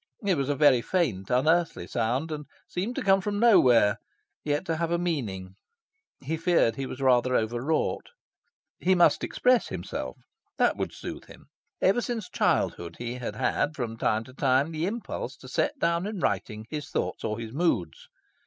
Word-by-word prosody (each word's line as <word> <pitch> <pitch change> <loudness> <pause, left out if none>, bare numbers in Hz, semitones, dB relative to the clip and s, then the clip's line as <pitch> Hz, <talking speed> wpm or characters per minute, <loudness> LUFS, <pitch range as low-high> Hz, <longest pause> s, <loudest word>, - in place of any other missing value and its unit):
It 195 - +3
was 140 -2 -1
a 145 - +1
very 135 -4 +5
faint, 115 - -1
unearthly 160 +7 +2
sound, 125 +7 -1
and 150 -2 -5 0.2
seemed 205 +8 -3
to - - -2
come 195 -1 +4
from 205 +1 -2
nowhere, 125 - +5 0.4
yet 145 +4 -1
to 165 -2 -1
have 165 0 -1
a 170 - +1
meaning. 110 - -3 0.7
He 155 +4 -3
feared 165 -9 +2
he 135 +1 -4
was 130 - -7
rather 125 -1 +3
over 120 +2 0
wrought. 155 +4 -1 0.7
He 185 +1 +3
must 175 - +4
express 250 -1 +2
himself. 85 -8 -5 0.4
That - - +3
would - - -3
soothe - - -8
him. - - -16 0.3
Ever 200 +6 +4
since 230 -5 -4
childhood 85 -1 0
he 120 0 -4
had 115 -4 -5
had, 145 +7 0
from 120 -4 -3
time 110 -1 0
to 130 - -14
time, 135 +3 +2
the 160 +2 -2
impulse 230 +3 -5
to - - -13
set 295 - -1
down 170 -4 0
in 210 -2 -4
writing 105 - -2
his 150 -2 -5
thoughts - - -2
or 105 - -2
his 115 -1 -7
moods. 140 - -1
145 Hz, 180 wpm, -27 LUFS, 115-175 Hz, 0.7 s, very